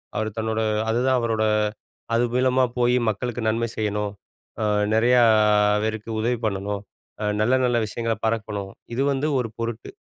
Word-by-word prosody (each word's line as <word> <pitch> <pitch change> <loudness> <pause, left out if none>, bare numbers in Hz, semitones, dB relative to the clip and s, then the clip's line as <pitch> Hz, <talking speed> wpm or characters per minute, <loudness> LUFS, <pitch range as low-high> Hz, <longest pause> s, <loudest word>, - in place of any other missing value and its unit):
அவர் 110 0 -1
தன்னோட 110 0 -1 0.3
அதுதான் 125 +2 +2
அவரோட 110 -2 0 0.7
அது 115 +1 +3
மூலமா 130 0 +3
போய் 125 0 +3
மக்களுக்கு 120 +3 -3
நன்மை 115 +1 0
செய்யணும், 105 -1 -1 0.5
ஆ - - +1 0.3
நெறையா 120 +2 +4 0.6
பேருக்கு 110 0 -3
உதவி 120 +2 0
பண்ணணும், 100 0 -2 0.4
அ - - -2 0.2
நல்ல, 120 +4 +2
நல்ல 120 -1 +2
விஷயங்கள 115 +1 -2
பரக்கணும், 105 -3 -2 0.2
இது 135 +3 0
வந்து 140 +3 -1
ஒரு 115 -3 -2
பொருட்டு. 115 0 -4
115 Hz, 145 wpm, -23 LUFS, 110-125 Hz, 0.7 s, நெறையா